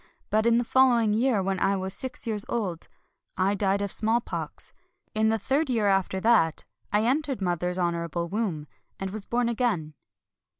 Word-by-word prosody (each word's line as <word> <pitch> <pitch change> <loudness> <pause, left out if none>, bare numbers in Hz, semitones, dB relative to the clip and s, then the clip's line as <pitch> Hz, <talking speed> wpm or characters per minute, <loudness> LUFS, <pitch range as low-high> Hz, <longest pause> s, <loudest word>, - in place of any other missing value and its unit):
But 220 +2 +3
in 235 0 +4
the 240 - +2
following 240 -4 +4
year, 225 -2 +2
when 190 0 -1
I 195 +1 +2
was 190 0 -3
six 260 +4 -2
years 215 -3 -1
old, 190 -8 -3 0.5
I 190 +2 +2
died 200 0 +1
of 200 - -3
smallpox. 225 +2 -1 0.4
In 220 0 +2
the 225 - +2
third 270 +8 0
year 230 -4 +1
after 195 -1 +1
that 215 -9 +3 0.3
I 210 +2 +2
entered 275 0 0
mother's 180 -1 -1
honorable 170 -1 -1
womb, 185 -6 -2 0.3
and 195 0 -3
was 210 0 -6
born 240 0 0
again." 220 -10 -1
210 Hz, 170 wpm, -27 LUFS, 185-235 Hz, 0.5 s, in